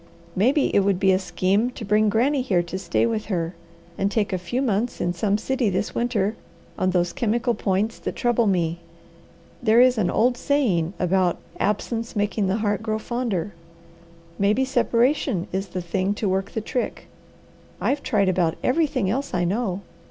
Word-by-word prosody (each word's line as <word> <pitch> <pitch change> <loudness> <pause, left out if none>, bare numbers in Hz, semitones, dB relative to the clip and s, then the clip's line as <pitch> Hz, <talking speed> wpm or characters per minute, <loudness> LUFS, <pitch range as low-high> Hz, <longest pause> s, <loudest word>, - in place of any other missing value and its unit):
Maybe 260 +9 +2
it - - +6
would 195 -2 +1
be 190 -1 +4
a 185 - +3
scheme 195 +4 +1
to 230 - -7
bring 210 +1 +3
Granny 260 +7 +2
here 185 -9 +1
to 180 +2 -5
stay 175 +2 +1
with 225 -2 -1
her, 170 -4 -2 0.5
and 195 - +2
take 205 -2 0
a 185 - 0
few 180 +8 -3
months 240 -2 0
in 175 - 0
some 200 +3 +1
city 245 0 0
this 195 +3 -2
winter 230 -3 0 0.4
on 185 - 0
those 175 -1 +1
chemical 240 -1 0
points 205 +1 -1
that - - -4
trouble 240 -2 +2
me. 170 -3 0 0.8
There 230 -1 +4
is 250 -2 +5
an 180 -4 +1
old 245 +1 +2
saying 200 - +1
about 180 0 +1 0.2
'absence 225 +3 -1
making 205 -1 0
the 190 +2 +1
heart 205 -1 0
grow 215 -1 -1
fonder.' 220 -5 -3 0.9
Maybe 210 +7 +2
separation 245 - +1
is 195 +2 -2
the 180 -1 -5
thing 190 +3 -1
to 210 - -2
work 190 +1 0
the 220 - -2
trick. 245 +3 -3 0.7
I've 285 +1 0
tried 205 -5 +1
about 175 -3 +1
everything 280 - +1
else 260 +3 -2
I 175 - +1
know. 195 +1 -1
205 Hz, 175 wpm, -23 LUFS, 185-240 Hz, 0.9 s, it